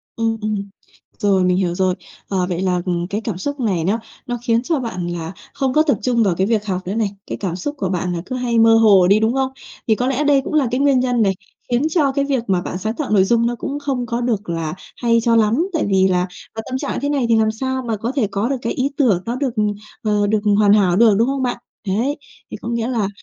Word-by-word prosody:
Ừm, 225 Hz, 0 st, 0 dB
ừm. 215 Hz, 0 st, -1 dB, 0.6 s
Rồi 195 Hz, -2 st, +3 dB
mình 180 Hz, 0 st, +2 dB
hiểu 180 Hz, -2 st, 0 dB
rồi. 185 Hz, 0 st, +1 dB, 0.3 s
Ờ, 185 Hz, -2 st, 0 dB
vậy 175 Hz, 0 st, -2 dB
là, 180 Hz, -2 st, +1 dB
ừm, 175 Hz, -1 st, -1 dB
cái 205 Hz, +3 st, -3 dB
cảm 215 Hz, -5 st, -4 dB
xúc 285 Hz, +8 st, -4 dB
này 195 Hz, -9 st, 0 dB
nó 205 Hz, +7 st, +1 dB, 0.3 s
nó 245 Hz, -1 st, -2 dB
khiến 230 Hz, -1 st, +2 dB
cho 310 Hz, +2 st, 0 dB
bạn 185 Hz, -8 st, -4 dB
là 170 Hz, -1 st, -4 dB, 0.2 s
không 265 Hz, -2 st, -1 dB
có 310 Hz, -, +5 dB
tập 300 Hz, -3 st, +2 dB
trung 240 Hz, -2 st, +2 dB
vào 190 Hz, -5 st, +1 dB
cái 190 Hz, -, +1 dB
việc 215 Hz, -2 st, 0 dB
học 185 Hz, -2 st, -2 dB
nữa 195 Hz, -, -2 dB
này. 220 Hz, -3 st, +1 dB, 0.2 s
Cái -, -, -4 dB
cảm 180 Hz, -4 st, -3 dB
xúc 290 Hz, +11 st, -4 dB
của 190 Hz, -7 st, -2 dB
bạn 180 Hz, -1 st, -1 dB
là 170 Hz, -, -3 dB
cứ 255 Hz, -, -4 dB
hay 240 Hz, -2 st, 0 dB
mơ 225 Hz, 0 st, +6 dB
hồ 205 Hz, -5 st, +6 dB
đi, 200 Hz, +3 st, +5 dB
đúng 220 Hz, +2 st, +1 dB
không? 265 Hz, 0 st, 0 dB, 0.4 s
Thì 220 Hz, -, +4 dB
có 250 Hz, +3 st, -1 dB
lẽ 270 Hz, +2 st, 0 dB
đây 285 Hz, -2 st, +4 dB
cũng -, -, -5 dB
là 295 Hz, -4 st, +3 dB
cái 250 Hz, -, 0 dB
nguyên 275 Hz, -2 st, +4 dB
nhân 245 Hz, -2 st, +1 dB
này 195 Hz, -3 st, +3 dB, 0.4 s
khiến 240 Hz, +2 st, +2 dB
cho 300 Hz, -4 st, +2 dB
cái 280 Hz, +1 st, 0 dB
việc 270 Hz, -4 st, 0 dB
mà 185 Hz, -3 st, +1 dB
bạn 180 Hz, -, -4 dB
sáng 215 Hz, +4 st, -2 dB
tạo 300 Hz, 0 st, -3 dB
nội 200 Hz, -3 st, +5 dB
dung 230 Hz, +4 st, +2 dB
nó 240 Hz, -, -1 dB
cũng 280 Hz, +5 st, -4 dB
không 270 Hz, -4 st, -2 dB
có 235 Hz, +1 st, -2 dB
được 220 Hz, -6 st, -1 dB
là 165 Hz, -2 st, -2 dB, 0.2 s
hay 230 Hz, -1 st, +2 dB
cho 230 Hz, 0 st, +3 dB
lắm. 230 Hz, -, +3 dB
Tại 320 Hz, -, +1 dB
vì 190 Hz, -1 st, +4 dB
là, 180 Hz, -1 st, +1 dB, 0.3 s
à, 220 Hz, -, -4 dB
tâm 260 Hz, -, -1 dB
trạng -, -, -3 dB
như -, -, -3 dB
thế 285 Hz, -, -1 dB
này 280 Hz, -4 st, +1 dB
thì 230 Hz, -, +5 dB
làm 220 Hz, 0 st, +2 dB
sao 260 Hz, +3 st, -2 dB
mà 220 Hz, -, -1 dB
có 230 Hz, +4 st, -2 dB
thể 250 Hz, -7 st, +2 dB
có 205 Hz, +5 st, -2 dB
được 275 Hz, -, 0 dB
cái 230 Hz, -, -2 dB
ý 260 Hz, +2 st, 0 dB
tưởng 220 Hz, -, +3 dB
nó 235 Hz, -, -2 dB
được, 255 Hz, -2 st, -2 dB
ừm, 210 Hz, -1 st, +1 dB, 0.3 s
ờ, 210 Hz, -1 st, +1 dB
được 215 Hz, +1 st, +2 dB, 0.2 s
hoàn 205 Hz, -1 st, +5 dB
hảo 190 Hz, -4 st, +4 dB
được, 220 Hz, 0 st, +5 dB
đúng 230 Hz, +3 st, +3 dB
không 270 Hz, -1 st, -1 dB
bạn? 245 Hz, -, -1 dB, 0.3 s
Đấy, 235 Hz, +10 st, 0 dB, 0.3 s
thì -, -, -5 dB
có -, -, -5 dB
nghĩa 235 Hz, 0 st, -1 dB
là 230 Hz, -6 st, 0 dB
225 Hz, 280 wpm, -19 LUFS, 195-255 Hz, 0.6 s, mơ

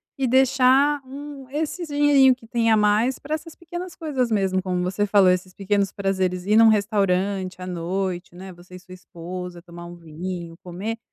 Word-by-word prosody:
e 270 Hz, -1 st, -1 dB
deixar 265 Hz, +3 st, +4 dB
um 275 Hz, -1 st, -9 dB
esses 315 Hz, +4 st, -3 dB
dinheirinho 285 Hz, -3 st, +4 dB
que 235 Hz, -, -18 dB
tem 230 Hz, -2 st, +1 dB
a 220 Hz, -, +5 dB
mais 210 Hz, +5 st, +2 dB
pra 300 Hz, +2 st, -6 dB
essas 315 Hz, +1 st, -5 dB
pequenas 350 Hz, +1 st, -8 dB
coisas 270 Hz, -7 st, -2 dB
mesmo, 190 Hz, -3 st, +1 dB
como 180 Hz, -1 st, -2 dB
você 190 Hz, +3 st, 0 dB
falou, 195 Hz, -2 st, +5 dB
esses 185 Hz, 0 st, -2 dB
pequenos 200 Hz, 0 st, 0 dB
prazeres, 190 Hz, -2 st, -1 dB
ir 210 Hz, +1 st, +2 dB
num 225 Hz, 0 st, +7 dB
restaurante 195 Hz, -3 st, +1 dB
à -, -, -5 dB
noite, 180 Hz, 0 st, -4 dB
né, 190 Hz, +1 st, -10 dB
você 175 Hz, +1 st, -15 dB
e 180 Hz, -, -9 dB
sua 185 Hz, 0 st, -14 dB
esposa, 180 Hz, 0 st, -8 dB
tomar 170 Hz, -1 st, -11 dB
um 175 Hz, -, -10 dB
vinho, 170 Hz, +1 st, -7 dB
comer, 195 Hz, +6 st, -5 dB
200 Hz, 185 wpm, -23 LUFS, 180-260 Hz, -, num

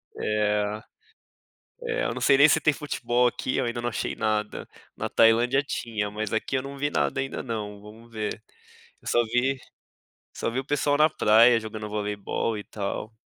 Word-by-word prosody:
É 105 Hz, 0 st, 0 dB, 1.0 s
é, 115 Hz, -, -1 dB
não 130 Hz, -, -5 dB
sei 135 Hz, +2 st, +5 dB
nem 145 Hz, +2 st, +8 dB
se 160 Hz, -, +4 dB
tem 150 Hz, 0 st, +3 dB
futebol 125 Hz, -4 st, 0 dB
aqui. 125 Hz, +1 st, -1 dB
Eu 130 Hz, -, +1 dB
ainda 120 Hz, 0 st, -3 dB
não 120 Hz, -, 0 dB
achei 115 Hz, -, -3 dB
nada. 105 Hz, -1 st, -2 dB, 0.3 s
Na -, -, -3 dB
Tailândia 120 Hz, +4 st, +4 dB
tinha, 110 Hz, -6 st, -3 dB
mas 110 Hz, -1 st, -4 dB
aqui 110 Hz, +4 st, -1 dB
eu 130 Hz, -, -1 dB
não 140 Hz, 0 st, -8 dB
vi 145 Hz, +1 st, 0 dB
nada 130 Hz, -, 0 dB
ainda 135 Hz, 0 st, -4 dB
não. 105 Hz, -4 st, -5 dB
Vamos 110 Hz, +3 st, -14 dB
ver. 110 Hz, -1 st, -4 dB, 0.6 s
Eu -, -, -12 dB
só 120 Hz, -, +3 dB
vi 125 Hz, +4 st, +1 dB, 0.8 s
só -, -, -2 dB
vi 125 Hz, -, -2 dB
o 135 Hz, -, -5 dB
pessoal 145 Hz, 0 st, +1 dB
na 155 Hz, +1 st, +5 dB
praia 115 Hz, -3 st, +5 dB
jogando 110 Hz, -1 st, -6 dB
voleibol 105 Hz, +1 st, -2 dB
e 105 Hz, -, -6 dB
tal. 105 Hz, +2 st, -5 dB
115 Hz, 180 wpm, -26 LUFS, 105-130 Hz, 1.0 s, nem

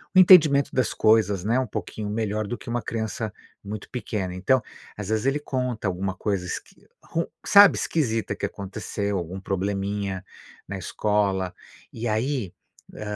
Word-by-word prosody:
um -, -, +8 dB
entendimento 155 Hz, -7 st, +7 dB
das 130 Hz, -3 st, +1 dB
coisas, 110 Hz, -4 st, +3 dB
né, 115 Hz, +4 st, +2 dB
um 130 Hz, -, -1 dB
pouquinho 105 Hz, 0 st, -5 dB
melhor 110 Hz, 0 st, -1 dB
do 120 Hz, -, -4 dB
que -, -, -10 dB
uma 120 Hz, 0 st, -1 dB
criança 110 Hz, 0 st, -3 dB, 0.3 s
muito 105 Hz, +1 st, -7 dB
pequena. 105 Hz, -7 st, -3 dB
Então, 125 Hz, +7 st, +2 dB, 0.4 s
às 105 Hz, -1 st, -5 dB
vezes, 110 Hz, +1 st, 0 dB
ele 140 Hz, +2 st, +2 dB
conta 125 Hz, -7 st, -2 dB
alguma 95 Hz, +1 st, -2 dB
coisa, 95 Hz, -1 st, -2 dB
esqui 90 Hz, -, -7 dB, 0.2 s
ru 165 Hz, +1 st, -2 dB, 0.2 s
sabe, 200 Hz, -2 st, +8 dB
esquisita 115 Hz, -9 st, -1 dB
que -, -, -3 dB
aconteceu, 100 Hz, +1 st, -3 dB
algum 90 Hz, +2 st, -5 dB
probleminha 100 Hz, 0 st, -2 dB, 0.4 s
na 100 Hz, -, -4 dB
escola, 95 Hz, -1 st, 0 dB, 0.4 s
e 115 Hz, +1 st, -5 dB
aí, 115 Hz, -2 st, -1 dB, 0.4 s
hã, 105 Hz, -1 st, -5 dB
105 Hz, 155 wpm, -25 LUFS, 100-120 Hz, 0.4 s, um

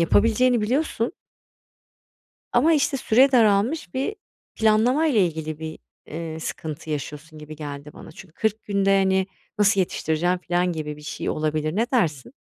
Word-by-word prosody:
yapabileceğini 230 Hz, +7 st, +3 dB
biliyorsun 245 Hz, +2 st, 0 dB, 1.4 s
ama 325 Hz, +1 st, +4 dB
işte 280 Hz, -1 st, +1 dB
süre 260 Hz, +4 st, +4 dB
daralmış 220 Hz, -, +2 dB
bir 275 Hz, +11 st, -2 dB, 0.4 s
planlamayla 235 Hz, +5 st, +3 dB
ilgili 155 Hz, -3 st, -2 dB
bir, 160 Hz, 0 st, -6 dB, 0.3 s
eee, 160 Hz, 0 st, -6 dB
sıkıntı 155 Hz, 0 st, -6 dB
yaşıyorsun 150 Hz, +2 st, -6 dB
gibi 155 Hz, 0 st, -9 dB
geldi 145 Hz, -1 st, -7 dB
bana. -, -, -12 dB
Çünkü 165 Hz, 0 st, -14 dB
40 220 Hz, -1 st, -1 dB
günde, 200 Hz, -1 st, +1 dB
hani, 190 Hz, 0 st, +2 dB, 0.3 s
nasıl 200 Hz, -1 st, +4 dB
yetiştireceğim 175 Hz, 0 st, 0 dB
filan 175 Hz, 0 st, 0 dB
gibi 150 Hz, -2 st, -5 dB
bir -, -, -13 dB
şey 150 Hz, -, -4 dB
olabilir, 155 Hz, +1 st, -1 dB
ne 225 Hz, +3 st, +2 dB
dersin? 155 Hz, -, 0 dB
185 Hz, 140 wpm, -23 LUFS, 155-230 Hz, 1.4 s, ama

